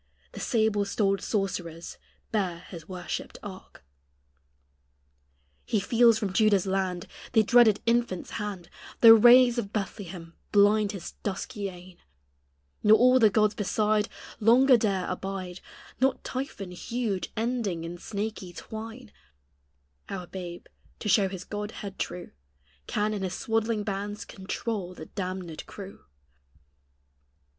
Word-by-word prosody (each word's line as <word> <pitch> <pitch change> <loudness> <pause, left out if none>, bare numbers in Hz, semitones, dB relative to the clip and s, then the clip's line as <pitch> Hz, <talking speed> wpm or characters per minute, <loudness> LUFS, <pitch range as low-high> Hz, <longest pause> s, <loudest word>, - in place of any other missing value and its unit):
The - - -9
sable 220 -4 +1
stoled 195 -1 0
sorcerers 180 -5 -3 0.3
bear 185 -6 -1
his 170 -2 -10
worshipped 180 -1 -5
ark. 190 - -11 1.8
He 215 - 0
feels 230 +2 +4
from 205 -4 -3
Juda's 205 -2 +3
land 190 -2 -1 0.3
The 220 -2 +5
dreaded 225 -2 +5
infant's 230 -6 0
hand 205 -5 -5 0.3
The 230 -1 +11
rays 240 +2 +7
of 200 -4 -4
Bethlehem 190 -5 -5 0.2
blind 205 0 +4
his 185 -4 -7
dusky 205 +1 -4
eyne; 180 0 -13 0.8
Nor 215 +1 +7
all 255 +1 +5
the 220 -3 +6
gods 215 0 +3
beside 210 +1 +1 0.3
Longer 250 +4 +6
dare 200 -5 0
abide 190 -2 -5 0.4
Not 265 +1 +1
Typhon 250 -8 -5
huge, 215 +1 -3
ending 225 -7 -1
in 170 +1 -6
snaky 205 -2 -5
twine; 225 +3 -8 1.0
Our 185 -2 -5
babe, 175 -1 -8 0.3
to 210 - -4
show 195 -2 +4
His 185 -2 -7
God 210 +1 -5
head 200 -3 -8
true, 180 -1 -4 0.6
Can 210 +1 0
in 205 - -3
His 185 -2 -2
swaddling 225 -1 0
bands 205 0 -4
control 190 -1 -4
the 155 - -8
damnèd 185 -3 -5
crew. 195 -1 -10
205 Hz, 125 wpm, -27 LUFS, 185-220 Hz, 1.8 s, The